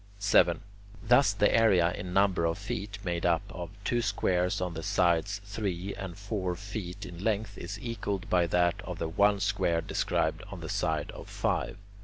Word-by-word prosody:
7. 100 -4 +4 0.4
Thus 125 0 +5
the 100 +1 +3
area 95 -7 +5
in 90 +1 -6
number 95 -2 +3
of 85 +2 0
feet 100 +1 -4
made 85 -1 -1
up 85 +1 +2
of 85 -2 -6
the 105 - -18
two 120 +3 +1
squares 95 -3 +1
on 90 -2 -2
the 80 - -5
sides 90 +4 +1
three 100 -2 -3
and 95 -3 -7
four 100 -3 -2
feet 100 -1 -6
in 90 0 -8
length 105 -2 0
is 100 +3 -6
equalled 105 -3 -3
by 90 -5 +3
that 85 0 +2
of - - -6
the 80 - -2
one 100 +4 +3
square 95 -4 +1
described - - 0
on - - -8
the - - -6
side - - -1
of - - -10
five. - - -1
100 Hz, 185 wpm, -29 LUFS, 90-105 Hz, 0.4 s, Thus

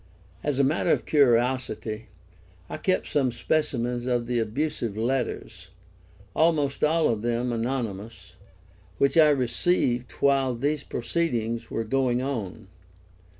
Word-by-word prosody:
As 145 -3 0
a 140 - +4
matter 140 +4 +1
of - - +2
curiosity 120 -4 +1 0.6
I - - -3
kept 185 +4 0
some 135 -4 +1
specimens 125 -2 -1
of 120 -2 0
the 120 0 0
abusive 115 -1 -2
letters, 125 +2 -2 0.7
almost 155 -4 +2
all 160 +2 +3
of 110 -3 -1
them 120 +1 -1
anonymous, 115 -5 -4 0.6
which 140 - +2
I 155 -2 +7
received 125 -2 +1
while 135 -2 +2
these 145 +4 -1
proceedings 115 -4 -2
were 115 - -2
going 125 +1 +1
on. 115 -9 -4
125 Hz, 120 wpm, -26 LUFS, 115-140 Hz, 0.7 s, I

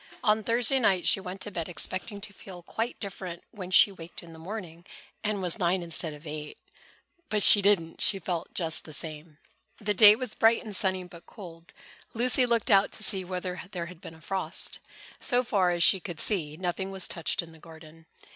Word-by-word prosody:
On 215 -1 +3
Thursday 240 +4 +2
night 190 -7 +2
she - - +4
went 190 0 -8
to 210 - -5
bed 170 -3 -3
expecting 185 +4 -2
to 205 0 -3
feel 180 -2 -11
quite 225 +7 -4
different 185 -3 -7
when 190 -5 -8
she 185 +2 +6
waked 170 -3 -10
in 165 -1 -13
the 160 - -12
morning 175 -2 -8 0.4
and 210 -3 -2
was 180 +4 -1
nine 180 0 +1
instead 165 -1 -2
of 150 +1 -12
eight. 150 0 -6 0.7
But 210 -1 +2
she 205 - +9
didn't. 190 -5 +2
She 200 - +3
felt 175 -2 -4
just 165 -3 +3
the 155 - -10
same. 155 0 -7 0.4
The 210 -1 -1
day 210 +1 +8
was 250 -1 -5
bright 225 +2 +3
and 215 -4 -4
sunny 190 -3 0
but 175 -1 -14
cold. 170 -4 -12 0.4
Lucy 250 +2 +3
looked 235 -3 +1
out 195 0 +5
to 215 - -3
see 195 -3 +1
whether 180 0 -5
there 175 -2 -3
had 175 0 -12
been 160 - -10
a 160 - -18
frost. 190 +3 -3 0.4
So 250 0 +1
far 195 -7 +1
as 175 -1 +1
she 190 - +5
could 170 -2 -7
see, 155 -8 -1
nothing 185 +2 -3
was 190 -1 -4
touched 170 0 -2
in 165 - -13
the 160 - -16
garden. 160 0 -15
185 Hz, 205 wpm, -28 LUFS, 170-205 Hz, 0.7 s, she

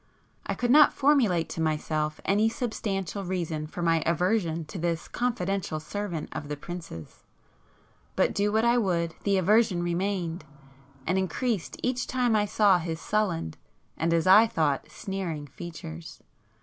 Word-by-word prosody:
I - - -1
could 245 -1 0
not 295 +1 +7
formulate 245 - +3
to 165 - -4
myself 155 -1 -1
any 210 +3 +3
substantial 200 -5 -3
reason 170 -4 -3
for 175 +3 -5
my 165 -1 +3
aversion 170 -1 0
to 180 - -7
this 170 0 -2
confidential 195 -8 -2
servant 170 +1 -4
of 145 - -6
the 150 0 -4
prince's,—but 80 - -7
do 205 +1 +1
what 220 +2 +2
I 240 +1 +4
would 170 -6 0
the 200 -1 +3
aversion 195 -1 +3
remained, 175 -1 -2 0.6
and 185 +3 +1
increased 205 +1 -2
each 250 0 -1
time 245 -3 +1
I 210 -1 +3
saw 200 -3 +4
his 165 -1 -4
sullen, 185 - -1 0.4
and 165 +2 0
as 165 -1 +2
I 210 +5 +8
thought, 150 -9 0
sneering 180 -7 -4
features. 165 +2 -9
180 Hz, 145 wpm, -27 LUFS, 165-210 Hz, 0.6 s, I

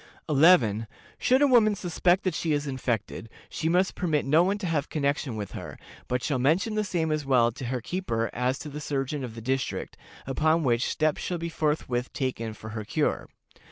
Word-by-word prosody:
"11. 135 - +4 0.3
Should 260 +3 +3
a - - +6
woman 225 -5 +5
suspect 180 +1 +1
that 185 - 0
she 155 0 -1
is 145 0 -1
infected, 120 -4 -3 0.2
she 160 - -2
must 180 +3 +2
permit 155 -5 0
no 150 +5 +5
one 195 +3 +1
to 205 - -5
have 160 -4 -1
connection 140 -4 -1
with 105 -3 -5
her, - - -8 0.3
but 125 0 -1
shall 130 0 0
mention 165 - +2
the 215 0 0
same 170 -5 -1
as 155 -1 0
well 125 -4 +3
to 125 +2 -7
her 125 0 -2
keeper 115 -8 -2
as 125 +2 0
to 150 - -7
the 150 +1 -7
surgeon 140 -1 -2
of 115 -3 -6
the 115 - -7
district, 130 +2 -2 0.3
upon 155 +5 +2
which 120 -2 +1
steps 155 -1 0
shall 180 - -2
forthwith 150 -7 -1
be - - -7
taken 115 -5 -2
for 110 - -9
her 110 -1 -4
cure. - - -1
145 Hz, 200 wpm, -27 LUFS, 125-170 Hz, 0.3 s, a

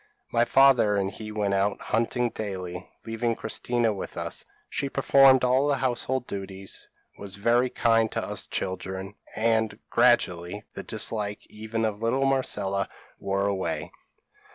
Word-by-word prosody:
My 120 0 +3
father 130 -6 +5
and 100 -1 0
he 110 0 -8
went 105 -2 0
out 100 +1 +1
hunting 120 +2 0
daily, 90 -4 -5 0.2
leaving 115 +1 -1
Christina 115 0 0
with 95 - -7
us. - - -3 0.2
She 140 - -2
performed 135 -1 +5
all 130 +3 +3
the 145 - +3
household 130 0 -1
duties; 95 -2 -6 0.3
was 100 -1 -4
very 120 +5 +2
kind 115 -2 +2
to - - -1
us - - -3
children; 95 +1 -4 0.2
and, 110 0 +1
gradually, 105 -5 +2
the - - -4
dislike 105 -1 -2
even 110 +1 -3
of 105 -1 -3
little 130 +4 +1
Marcella 100 -8 +1 0.3
wore 100 0 -1
away. 100 -2 -2
110 Hz, 140 wpm, -26 LUFS, 100-120 Hz, 0.3 s, father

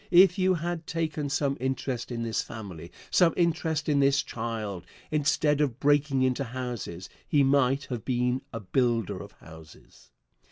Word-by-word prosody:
If 185 +1 +6
you 185 0 +3
had 170 0 -4
taken 155 -3 -2
some 140 -1 0
interest 130 -1 -2
in 115 -1 -3
this 115 -1 -1
family 90 -6 -8 0.2
some 175 -3 +4
interest 160 -3 0
in 145 -2 +3
this 140 0 +3
child 110 -5 -4 0.3
instead 150 0 +2
of 135 -4 0
breaking 145 -2 +3
into 130 +1 +1
houses, 120 -8 -5 0.2
he 145 -2 +3
might 135 0 +3
have 125 -4 -5
been 125 0 0
a 115 - -5
builder 115 0 0
of - - -11
houses. 80 -5 -16
135 Hz, 155 wpm, -28 LUFS, 115-150 Hz, 0.3 s, If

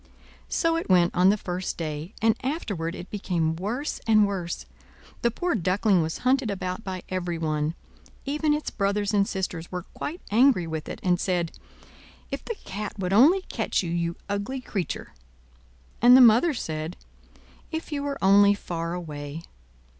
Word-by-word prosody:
So 330 0 +1
it 330 - -4
went 175 -2 +4
on 180 +1 +5
the 205 - +3
first 180 -2 -4
day; 155 +3 -5
and 225 0 +5
afterward 205 - -2
it 180 - -9
became 170 -6 -1
worse 225 - -3
and 215 -2 +6
worse. 185 -4 -3 0.6
The 235 - +3
poor 350 +10 -1
Duckling 190 0 +2
was 160 0 -2
hunted 260 -2 +3
about 185 0 -3
by 185 -2 -5
everyone: 165 -4 -1 0.5
even 300 +2 0
its 300 0 -1
brothers 205 +1 0
and 200 -1 +3
sisters 180 -3 -4
were 180 -1 -4
quite 320 - -6
angry 230 -5 +5
with 160 -1 -5
it, - - -6
and 180 -1 +2
said: 175 -3 0 0.8
"If - - -4
the 460 - -4
cat 205 +2 -5
would 190 -1 -1
only 315 - +6
catch - - -1
you, 170 - -3
you 170 0 -1
ugly 200 +6 -2
creature!" 200 - -4 0.9
And 245 +2 +9
the - - +7
mother 250 +6 +6
said: 155 -3 -4 0.7
"If 320 0 -5
you 290 -1 -2
were 285 -1 -3
only 200 +1 +6
far 170 -3 -4
away!" 150 -2 -6
195 Hz, 160 wpm, -26 LUFS, 170-235 Hz, 0.9 s, And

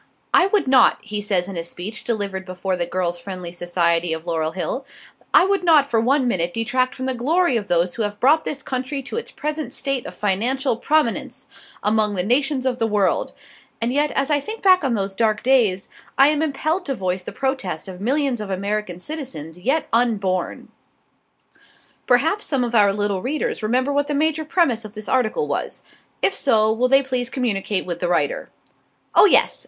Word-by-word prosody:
"I 365 - +6
would 400 -6 +1
not," 260 -2 +5
he 210 -1 -4
says 190 -3 +1
in 195 - -7
a 165 - -2
speech 180 +5 -6
delivered 200 -5 -2
before 185 0 -3
the 175 -1 -2
Girls' 175 -1 -2
Friendly 180 -1 -7
Society 175 -1 0
of 160 +1 -6
Laurel 160 -2 -1
Hill, 190 +9 -3 0.5
"I - - +6
would 395 -1 +1
not 310 -5 +5
for 230 -4 +1
one 260 +3 +2
minute 175 -6 0
detract 255 +3 0
from 260 - -5
the 260 - -1
glory 290 +5 +1
of 210 -3 -2
those 175 +1 +1
who 235 - -4
have 205 -1 -3
brought 305 +5 +4
this 280 -2 -5
country 265 +2 -4
to 355 - -6
its 465 - -4
present 305 +1 -4
state 275 -3 -2
of - - -9
financial 235 +7 0
prominence 300 0 0 0.4
among 210 -1 +1
the 180 - 0
nations 265 +4 +1
of 255 -1 -1
the 225 - +1
world, 205 -3 0 0.5
and 235 +2 -1
yet 295 +2 +2
as 275 +2 0
I 290 - +3
think 435 +10 -7
back 370 -3 +5
on 260 -4 +1
those 195 -1 -2
dark 215 +1 0
days, 230 -8 +2 0.3
I 275 +2 +7
am 300 0 0
impelled 315 +4 -1
to 270 - -1
voice 185 -3 -2
the - - -8
protest 265 - -3
of 185 -1 -9
millions 265 0 0
of 210 - -6
American 200 -1 -3
citizens 180 - -7
yet 270 - 0
unborn." 200 -6 0 1.4
Perhaps 315 +12 +2
some 270 -4 +1
of 240 -1 -3
our 205 -3 +5
little 205 -1 -1
readers 285 +2 -2
remember 255 +6 0
what 285 0 +1
the 295 - -1
major 315 +1 0
premise 275 -9 +1
of 215 0 -11
this 215 0 -6
article 260 - +1
was. - - -4 0.4
If 390 - +3
so, 220 -4 +3
will 245 +3 +1
they 270 +1 +4
please 255 -2 -2
communicate 210 -7 -1
with 175 -1 -4
the 180 - -1
writer. - - 0 0.6
Oh, - - +7
yes! 410 - +4
235 Hz, 195 wpm, -21 LUFS, 195-275 Hz, 1.4 s, I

